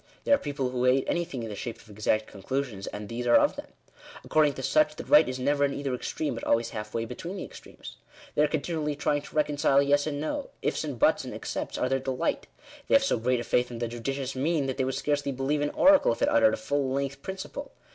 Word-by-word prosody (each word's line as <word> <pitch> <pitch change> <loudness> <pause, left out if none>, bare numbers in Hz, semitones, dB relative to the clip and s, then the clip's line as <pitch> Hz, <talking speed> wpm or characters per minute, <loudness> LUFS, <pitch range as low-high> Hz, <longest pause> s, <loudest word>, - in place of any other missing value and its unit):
There - - +3
are 280 - +5
people 140 -3 -3
who 125 0 0
hate 130 +1 +4
anything 170 -8 -2
in 115 - -5
the 105 - -5
shape 115 +3 -5
of 115 - -18
exact 110 +1 0
conclusions; 105 0 -4
and 105 0 -6
these 120 +2 -4
are 120 - +6
of - - +4
them. - - -8 0.6
According 150 -2 +3
to 135 - -6
such, 155 +3 +3
the - - -6
right 150 -2 +6
is 130 - -3
never 145 +2 +1
in 140 -1 +1
either 140 -2 -2
extreme, 145 +3 -3
but 115 - -7
always 115 0 +1
halfway 105 +2 -4
between 170 - -6
the - - -4
extremes. - - -11 0.4
They - - +2
are 150 - +5
continually 150 0 -2
trying 145 0 0
to 145 - -14
reconcile 145 -2 +3
Yes 145 +1 +3
and 145 -2 -2
No. 275 - -3 0.2
Ife, - - 0
and 145 -5 -4
buts, - - +3
and - - -7
excepts, - - -4
are - - +1
their 135 - +1
delight. 130 -1 -2 0.4
They - - +4
have 275 - +5
so 275 - +1
great 125 +1 +1
a - - -4
faith 125 +1 +1
in 120 - -7
"the 120 0 -2
judicious 130 +3 -4
mean" 145 +2 +1
that 130 -1 -3
they 130 - +1
would 130 - -2
scarcely 145 -1 -1
believe 135 +3 -1
an 145 - +1
oracle, 290 - +5
if - - -3
it 285 - +4
uttered 290 -2 +4
a - - -10
fall 140 -2 -1
length 140 0 -2
principle. 195 - -6
140 Hz, 245 wpm, -27 LUFS, 125-150 Hz, 0.6 s, are